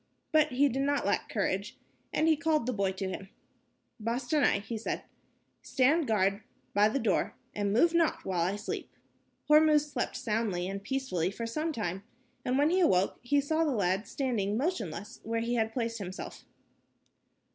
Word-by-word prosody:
But 310 -1 +5
he 280 +3 +4
did 270 0 -1
not 285 +1 +1
lack - - 0
courage, - - -2 0.3
and 315 - +2
he 320 - +5
called 310 -4 +1
the 255 - -1
boy 200 -3 0
to 190 0 -3
him. 190 +1 -6 0.7
"Bostanai," 245 0 +1
he 225 +3 -5
said, 220 - -3 0.6
"stand 285 +4 +2
guard 200 -1 +2 0.3
by 205 +1 +5
the 225 - -1
door, 220 -8 0 0.2
and 205 -1 -1
move 325 +11 +4
not 335 -2 +1
while 180 -3 0
I 185 +4 +1
sleep." 205 +1 -5 0.6
Hormuz 300 -1 +5
slept - - -2
soundly 215 -7 -1
and 195 +1 -5
peacefully 260 -10 -1
for 230 +4 -5
some 305 +8 -2
time, 195 - -3 0.4
and 250 +1 0
when 295 +3 +3
he 370 - +3
awoke 190 - +3
he 285 +4 +2
saw 315 +3 +1
the 315 - +1
lad 195 0 0
standing 220 -7 -1
motionless 230 - -3
where 230 +1 -2
he 235 +1 -1
had 225 -2 +1
placed 230 -1 -2
himself. 185 -1 -7
230 Hz, 170 wpm, -30 LUFS, 200-285 Hz, 0.7 s, But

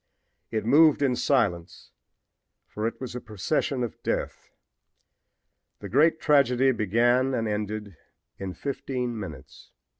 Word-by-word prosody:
It 110 -1 -2
moved 145 +4 +5
in 130 -3 +2
silence, 95 -11 -1 0.7
for 110 +1 -3
it 115 - -6
was 130 -3 -6
a 125 - -5
procession 120 +5 -2
of 120 - -6
death. - - -3 1.3
The 100 - -9
great 155 - +3
tragedy 135 -3 +3
began 120 +4 +2
and 115 -2 -1
ended 105 -2 -4 0.4
in 95 -1 -5
fifteen 125 -4 -4
minutes. 80 -10 -10
120 Hz, 120 wpm, -26 LUFS, 105-135 Hz, 1.3 s, moved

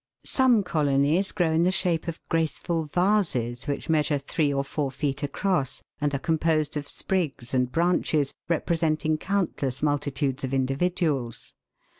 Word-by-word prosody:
Some 250 -6 +3
colonies 150 +3 +2
grow 175 -5 +1
in 160 +1 +2
the 175 - +4
shape 180 -3 0
of 170 -1 -6
graceful 165 +1 0
vases, 155 - 0
which 140 - -3
measure 155 -2 +2
three 145 +2 0
or 140 0 0
four 140 0 -2
feet 140 +1 -2
across, 145 -1 -1 0.2
and 145 0 +1
are - - +2
composed 155 +1 0
of 145 -1 -3
sprigs 155 -11 -2
and 125 -1 +1
branches 165 -4 +1 0.2
representing 155 -2 +1
countless 160 -10 -1
multitudes 145 -2 0
of 130 +1 -1
individuals. 135 -2 -1
155 Hz, 140 wpm, -26 LUFS, 140-170 Hz, 0.2 s, the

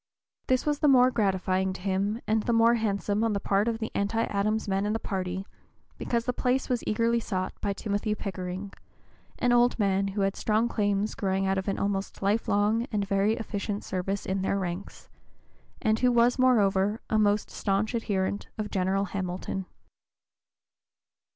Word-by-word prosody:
This 255 -1 +2
was 295 -1 0
the 300 - +3
more 255 -2 +6
gratifying 190 -3 0
to 185 - -9
him 200 +4 -1
and 220 0 +2
the 235 - 0
more 230 +1 +5
handsome 210 -1 0
on 225 -2 +1
the 200 - 0
part 200 +2 +1
of 230 -1 0
the 225 -1 -4
anti 215 +3 0
Adams 215 +2 -1
men 195 +1 0
in 210 - 0
the - - +1
party, 190 -2 -3 0.5
because 235 -1 -1
the 250 - 0
place 255 +2 0
was 245 -2 0
eagerly 230 +2 +2
sought 185 -4 -3
by 200 - 0
Timothy 205 +1 -2
Pickering, 190 0 -5 0.6
an 245 - +1
old 240 0 +4
man 195 -2 +1
who 200 +1 -2
had 195 0 +1
strong 220 +2 +1
claims 205 -2 0
growing 195 -1 -1
out 190 0 +1
of 190 - -6
an 195 - 0
almost 200 0 -2
life 205 +3 +1
long 210 +4 +2
and 205 -2 -1
very 200 +2 +2
efficient 205 -3 -4
service 190 +2 -3
in 190 0 -1
their 195 +1 0
ranks, 180 0 -5 0.8
and 220 -2 +2
who 250 0 +3
was 240 +2 +3
moreover 210 -4 +3
a 215 - +3
most 205 0 +2
stanch 200 +3 -1
adherent 200 -3 -1
of 215 -1 -4
General 195 +1 +1
Hamilton. 185 0 -4
205 Hz, 175 wpm, -27 LUFS, 195-225 Hz, 0.8 s, more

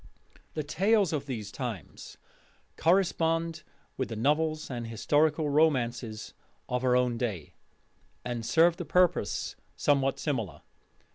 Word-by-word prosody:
The 155 - -1
tales 195 +4 +2
of 145 -2 -2
those 110 -6 -5
times 115 - -7 0.6
correspond 165 -2 +1 0.4
with 130 - -2
the 115 - -4
novels 155 +6 +1
and 120 -2 -4
historical 150 +6 +1
romances 125 -7 +1 0.3
of 125 0 -2
our 125 -1 +3
own 125 -2 +1
day, 100 -11 -3 0.7
and 120 -2 -3
served 170 +7 +3
a - - -4
purpose 180 - +1 0.2
somewhat 135 -2 +2
similar. 110 - -3
140 Hz, 120 wpm, -29 LUFS, 120-160 Hz, 0.7 s, our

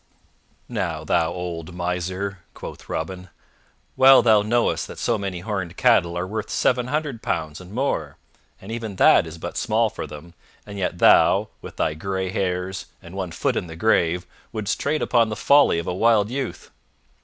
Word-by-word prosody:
"Now 90 -9 -3
thou 80 +1 +1
old 85 -1 -6
miser!" 90 +2 -3 0.2
quoth - - -9
Robin, 90 +3 -4 0.7
"well 130 -1 +7
thou 110 -3 +5
knowest 115 +3 0
that - - -10
so 120 - 0
many 95 -3 -4
horned 95 -3 -4
cattle 90 -9 +3
are 90 - -1
worth 105 +3 -4
seven 125 -1 +1
hundred 145 -4 -2
pounds 80 -2 -3
and 90 +1 -12
more, 130 +6 -2 0.4
and 100 - -10
even 115 -3 -5
that 85 - +5
is 80 +1 -9
but - - -6
small 110 0 +1
for 80 - -6
them, 75 +3 -11 0.3
and 100 -1 -8
yet 90 -2 -2
thou, - - +5
with - - -10
thy 75 - 0
gray 95 +3 -3
hairs 90 0 -2
and 85 -1 -13
one 95 -2 -4
foot 80 - -1
in - - -2
the 80 - -9
grave, 90 -3 +2 0.3
wouldst 105 -2 -2
trade 150 +2 0
upon 115 -3 +3
the 110 - -3
folly 140 -8 +4
of 85 - -3
a 90 - -2
wild 110 +2 +3
youth." 135 -1 -5
95 Hz, 180 wpm, -23 LUFS, 85-110 Hz, 0.7 s, well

